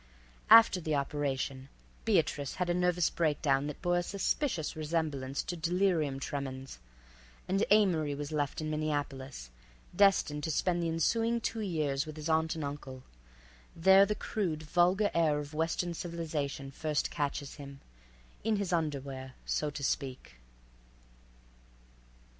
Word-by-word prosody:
After 225 Hz, -4 st, +8 dB
the 155 Hz, -2 st, -1 dB
operation 140 Hz, -1 st, -2 dB, 0.4 s
Beatrice 160 Hz, -9 st, +1 dB
had 180 Hz, -2 st, 0 dB
a -, -, +2 dB
nervous 180 Hz, -1 st, +2 dB
breakdown 145 Hz, -3 st, +1 dB
that 150 Hz, -, -7 dB
bore 175 Hz, 0 st, +2 dB
a -, -, 0 dB
suspicious 195 Hz, -, -1 dB
resemblance 150 Hz, -4 st, -2 dB
to 175 Hz, -, -4 dB
delirium 165 Hz, -4 st, +1 dB
tremens, 135 Hz, -, -5 dB, 0.7 s
and 195 Hz, +3 st, +1 dB
Amory 175 Hz, -9 st, +3 dB
was 145 Hz, +1 st, -5 dB
left 145 Hz, 0 st, -1 dB
in 155 Hz, 0 st, -3 dB
Minneapolis, 145 Hz, -, -3 dB, 0.4 s
destined 175 Hz, -7 st, +3 dB
to -, -, -2 dB
spend 175 Hz, +3 st, +1 dB
the 165 Hz, -, 0 dB
ensuing 225 Hz, +9 st, +1 dB
two 225 Hz, 0 st, -3 dB
years 155 Hz, -8 st, -1 dB
with 155 Hz, 0 st, -8 dB
his 155 Hz, +1 st, -4 dB
aunt 160 Hz, 0 st, +2 dB
and 160 Hz, -, -4 dB
uncle. 135 Hz, -2 st, -6 dB, 0.7 s
There 190 Hz, +4 st, +6 dB
the 210 Hz, -, -1 dB
crude, 175 Hz, -9 st, -2 dB
vulgar 180 Hz, +6 st, +2 dB
air 160 Hz, -3 st, +3 dB
of 145 Hz, 0 st, -6 dB
Western 165 Hz, +2 st, -1 dB
civilization 155 Hz, -5 st, -4 dB
first 150 Hz, +1 st, -1 dB
catches 145 Hz, -1 st, -3 dB
him—in -, -, -7 dB
his 200 Hz, -3 st, -2 dB
underwear, 140 Hz, -5 st, -3 dB
so 150 Hz, -, 0 dB
to 145 Hz, -1 st, -7 dB
speak. 130 Hz, -, -3 dB
155 Hz, 135 wpm, -31 LUFS, 140-175 Hz, 0.7 s, After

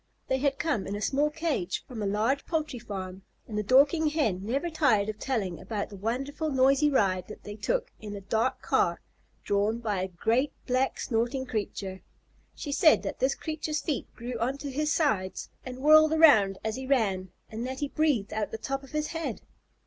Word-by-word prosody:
They 265 Hz, -, +1 dB
had 275 Hz, 0 st, +1 dB
come 290 Hz, -, -1 dB
in 200 Hz, -, -3 dB
a -, -, -3 dB
small 285 Hz, +7 st, +2 dB
cage 300 Hz, -, -2 dB
from 235 Hz, -4 st, -6 dB
a 205 Hz, -, 0 dB
large 220 Hz, +8 st, +1 dB
poultry 310 Hz, -6 st, -2 dB
farm, 190 Hz, -4 st, -6 dB, 0.3 s
and 215 Hz, -, -6 dB
the 210 Hz, -, +1 dB
Dorking 280 Hz, -, +4 dB
Hen 255 Hz, -, 0 dB
never 270 Hz, +10 st, -1 dB
tired 220 Hz, -10 st, +3 dB
of 215 Hz, 0 st, -5 dB
telling 205 Hz, -10 st, -2 dB
about 210 Hz, -3 st, -4 dB
the 205 Hz, -, -9 dB
wonderful, 270 Hz, +10 st, -2 dB
noisy 275 Hz, +2 st, +4 dB
ride 190 Hz, -9 st, +1 dB
that -, -, -10 dB
they 205 Hz, -, -7 dB
took -, -, -1 dB
in 210 Hz, -1 st, -7 dB
a 200 Hz, -, -7 dB
dark 225 Hz, +6 st, 0 dB
car -, -, +2 dB, 0.4 s
drawn 205 Hz, +3 st, +1 dB
by 210 Hz, -5 st, -2 dB
a 190 Hz, -, -1 dB
great, 225 Hz, -, 0 dB
black, 255 Hz, +1 st, 0 dB
snorting 240 Hz, +3 st, -1 dB
creature. 200 Hz, -5 st, -4 dB, 0.5 s
She 290 Hz, -, -5 dB
said 310 Hz, +2 st, +5 dB
that -, -, -4 dB
this 265 Hz, +1 st, +2 dB
creature's 310 Hz, -1 st, -3 dB
feet 300 Hz, -6 st, -2 dB
grew 240 Hz, 0 st, -5 dB
on 255 Hz, +4 st, 0 dB
to 280 Hz, 0 st, -6 dB
his 300 Hz, +3 st, 0 dB
sides 215 Hz, -, 0 dB
and 255 Hz, -1 st, -7 dB
whirled 310 Hz, +3 st, +6 dB
around 220 Hz, -12 st, +6 dB
as 220 Hz, +2 st, -2 dB
he 265 Hz, 0 st, -6 dB
ran, 195 Hz, -9 st, +1 dB, 0.2 s
and 220 Hz, +2 st, -4 dB
that 260 Hz, +1 st, -5 dB
he 290 Hz, -, 0 dB
breathed 280 Hz, -9 st, 0 dB
out 215 Hz, -1 st, 0 dB
of -, -, -20 dB
the -, -, -4 dB
top 270 Hz, +4 st, -3 dB
of 270 Hz, -, -14 dB
his 305 Hz, 0 st, -1 dB
head. 330 Hz, 0 st, -4 dB
255 Hz, 200 wpm, -28 LUFS, 210-290 Hz, 0.5 s, whirled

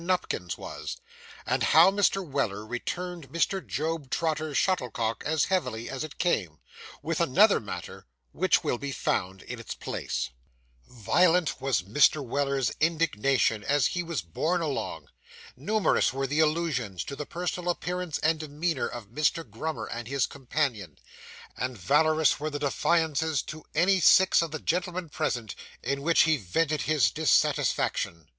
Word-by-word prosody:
NUPKINS 180 Hz, +1 st, -1 dB
WAS; -, -, -6 dB, 0.5 s
AND -, -, 0 dB
HOW 190 Hz, -, +6 dB
MR. 195 Hz, -1 st, +1 dB
WELLER 110 Hz, -7 st, -2 dB
RETURNED 170 Hz, +6 st, -5 dB
MR. 175 Hz, +3 st, 0 dB
JOB 155 Hz, -2 st, -3 dB
TROTTER'S 155 Hz, -2 st, -1 dB
SHUTTLECOCK 125 Hz, -, 0 dB
AS 160 Hz, -1 st, +2 dB
HEAVILY 125 Hz, -12 st, -2 dB
AS 135 Hz, +2 st, -4 dB
IT 155 Hz, -, -8 dB
CAME 95 Hz, -, 0 dB, 0.5 s
WITH 165 Hz, +1 st, -1 dB
ANOTHER 195 Hz, +7 st, +5 dB
MATTER, 105 Hz, -, -8 dB, 0.2 s
WHICH -, -, +2 dB
WILL 120 Hz, -, -1 dB
BE 140 Hz, -1 st, -4 dB
FOUND 95 Hz, -5 st, -2 dB
IN -, -, -7 dB
ITS -, -, -6 dB
PLACE -, -, -4 dB, 0.6 s
Violent 165 Hz, -, +2 dB
was 130 Hz, -9 st, +1 dB
Mr. 140 Hz, +8 st, +3 dB
Weller's 140 Hz, +1 st, 0 dB
indignation 140 Hz, -8 st, +1 dB
as 145 Hz, +2 st, +2 dB
he 175 Hz, -, -1 dB
was 170 Hz, -, -3 dB
borne 160 Hz, -, -1 dB
along; 150 Hz, -4 st, -3 dB, 0.5 s
numerous 205 Hz, -, +1 dB
were 135 Hz, +1 st, -2 dB
the 145 Hz, +3 st, -1 dB
allusions 150 Hz, -, 0 dB
to 140 Hz, -, -6 dB
the 150 Hz, -, -6 dB
personal 180 Hz, 0 st, -3 dB
appearance 180 Hz, -2 st, -2 dB
and 160 Hz, 0 st, +2 dB
demeanour 155 Hz, 0 st, -2 dB
of 115 Hz, -4 st, -8 dB
Mr. 150 Hz, +5 st, 0 dB
Grummer 115 Hz, +2 st, -4 dB
and 120 Hz, 0 st, -6 dB
his 135 Hz, 0 st, +1 dB
companion; 125 Hz, -, -3 dB, 0.6 s
and 125 Hz, -1 st, -3 dB
valorous 155 Hz, -, +3 dB
were 155 Hz, +1 st, -2 dB
the 145 Hz, -, -4 dB
defiances 160 Hz, +1 st, +1 dB
to 155 Hz, 0 st, -9 dB
any 185 Hz, +4 st, +4 dB
six 190 Hz, +1 st, +6 dB
of 165 Hz, -, -2 dB
the 155 Hz, -, -4 dB
gentlemen 180 Hz, +1 st, -2 dB
present, 120 Hz, -, -2 dB, 0.3 s
in 140 Hz, +3 st, -1 dB
which 165 Hz, +3 st, +4 dB
he 160 Hz, -1 st, +4 dB
vented 150 Hz, -, 0 dB
his 155 Hz, -2 st, +2 dB
dissatisfaction. 145 Hz, -, +1 dB
150 Hz, 150 wpm, -27 LUFS, 125-165 Hz, 0.6 s, HOW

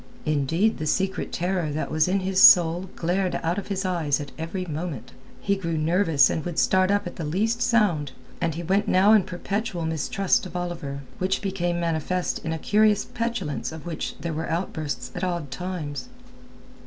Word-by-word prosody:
Indeed 155 Hz, +8 st, +1 dB
the 155 Hz, -, -2 dB
secret 190 Hz, +4 st, -1 dB
terror 180 Hz, -2 st, -1 dB
that 155 Hz, -, -3 dB
was 155 Hz, +1 st, +3 dB
in 190 Hz, +1 st, +1 dB
his 190 Hz, 0 st, +1 dB
soul 175 Hz, +1 st, +7 dB
glared 180 Hz, +2 st, 0 dB
out 170 Hz, +4 st, 0 dB
of -, -, -8 dB
his 195 Hz, -1 st, -2 dB
eyes 165 Hz, -6 st, 0 dB
at 145 Hz, -2 st, -7 dB
every 170 Hz, +3 st, -4 dB
moment. 155 Hz, -6 st, -5 dB, 0.3 s
He 200 Hz, -, 0 dB
grew 170 Hz, -4 st, -3 dB
nervous 160 Hz, -3 st, +4 dB
and 160 Hz, -, -2 dB
would 175 Hz, -2 st, -5 dB
start 185 Hz, 0 st, +3 dB
up 205 Hz, 0 st, +1 dB
at 175 Hz, -, -7 dB
the 165 Hz, -, -4 dB
least 215 Hz, +10 st, 0 dB
sound, 200 Hz, -, +2 dB, 0.3 s
and 165 Hz, -3 st, 0 dB
he 170 Hz, -, -4 dB
went 195 Hz, +4 st, +1 dB
now 195 Hz, +4 st, +5 dB
in 215 Hz, -, +6 dB
a -, -, -9 dB
perpetual 195 Hz, 0 st, -3 dB
mistrust 170 Hz, +5 st, 0 dB
of 180 Hz, -, -13 dB
Oliver, 170 Hz, -6 st, -4 dB, 0.2 s
which 185 Hz, +1 st, 0 dB
became 175 Hz, -3 st, -1 dB
manifest 170 Hz, +2 st, -1 dB
in 160 Hz, -, -3 dB
a 160 Hz, -, -1 dB
curious 210 Hz, +3 st, +3 dB
petulance 230 Hz, -13 st, -3 dB
of 160 Hz, -2 st, -9 dB
which 170 Hz, -3 st, -4 dB
there 165 Hz, +2 st, -3 dB
were 160 Hz, +2 st, -3 dB
outbursts 160 Hz, -5 st, -3 dB
at 180 Hz, -, -5 dB
odd 170 Hz, -6 st, -2 dB
times. 175 Hz, -, -5 dB
175 Hz, 190 wpm, -25 LUFS, 160-190 Hz, 0.3 s, soul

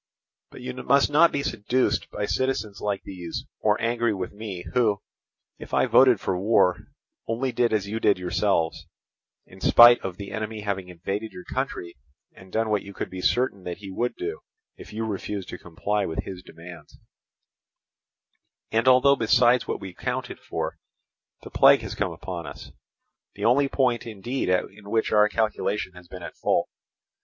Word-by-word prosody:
"But -, -, -12 dB
you 65 Hz, -, -5 dB
must 140 Hz, +3 st, +2 dB
not 165 Hz, +3 st, +6 dB
be 140 Hz, -, -2 dB
seduced 125 Hz, +1 st, 0 dB
by 105 Hz, -, -3 dB
citizens 120 Hz, -5 st, -2 dB
like 100 Hz, -2 st, -2 dB
these 90 Hz, -3 st, -6 dB
or 105 Hz, -1 st, +2 dB
angry 115 Hz, -1 st, 0 dB
with 95 Hz, -1 st, -4 dB
me—who, 105 Hz, +1 st, -1 dB, 0.6 s
if -, -, -5 dB
I -, -, +4 dB
voted 130 Hz, -5 st, +5 dB
for 90 Hz, -2 st, -2 dB
war, 95 Hz, -3 st, +2 dB, 0.4 s
only 125 Hz, +3 st, -1 dB
did 120 Hz, 0 st, +1 dB
as 105 Hz, -3 st, 0 dB
you 110 Hz, +2 st, -3 dB
did 105 Hz, -, +3 dB
yourselves—in 90 Hz, 0 st, -3 dB
spite 120 Hz, 0 st, +8 dB
of 95 Hz, -2 st, -5 dB
the 100 Hz, -1 st, -7 dB
enemy 110 Hz, 0 st, -4 dB
having 95 Hz, -3 st, -3 dB
invaded 95 Hz, +5 st, -4 dB
your 180 Hz, -, -9 dB
country 130 Hz, -, -4 dB, 0.4 s
and 95 Hz, -1 st, -16 dB
done 110 Hz, +1 st, 0 dB
what 105 Hz, -2 st, +2 dB
you 100 Hz, -1 st, -11 dB
could -, -, -5 dB
be 95 Hz, 0 st, -6 dB
certain 120 Hz, -3 st, +1 dB
that 90 Hz, -1 st, -4 dB
he 100 Hz, -1 st, -9 dB
would 120 Hz, +6 st, -2 dB
do, 410 Hz, +5 st, -4 dB, 0.4 s
if -, -, -12 dB
you 110 Hz, +1 st, -3 dB
refused 100 Hz, -2 st, -4 dB
to -, -, -7 dB
comply 100 Hz, +4 st, -2 dB
with 80 Hz, -, -3 dB
his 95 Hz, -2 st, -8 dB
demands; 85 Hz, 0 st, -13 dB, 1.7 s
and 115 Hz, +2 st, +1 dB
although 130 Hz, +2 st, +6 dB
besides 120 Hz, 0 st, +3 dB
what -, -, -2 dB
we 95 Hz, -2 st, -8 dB
counted 125 Hz, +5 st, -4 dB
for, -, -, -4 dB, 0.6 s
the -, -, -10 dB
plague -, -, +6 dB
has -, -, -6 dB
come -, -, -1 dB
upon 85 Hz, -4 st, -6 dB
us—the 100 Hz, +7 st, -11 dB
only 135 Hz, +5 st, +4 dB
point 125 Hz, -4 st, 0 dB
indeed 115 Hz, +2 st, -3 dB
at 90 Hz, 0 st, +2 dB, 0.2 s
which 110 Hz, +2 st, 0 dB
our 105 Hz, 0 st, +5 dB
calculation 105 Hz, -3 st, -1 dB
has 90 Hz, -1 st, -14 dB
been 90 Hz, 0 st, -9 dB
at -, -, -8 dB
fault. -, -, +1 dB
105 Hz, 165 wpm, -25 LUFS, 95-120 Hz, 1.7 s, spite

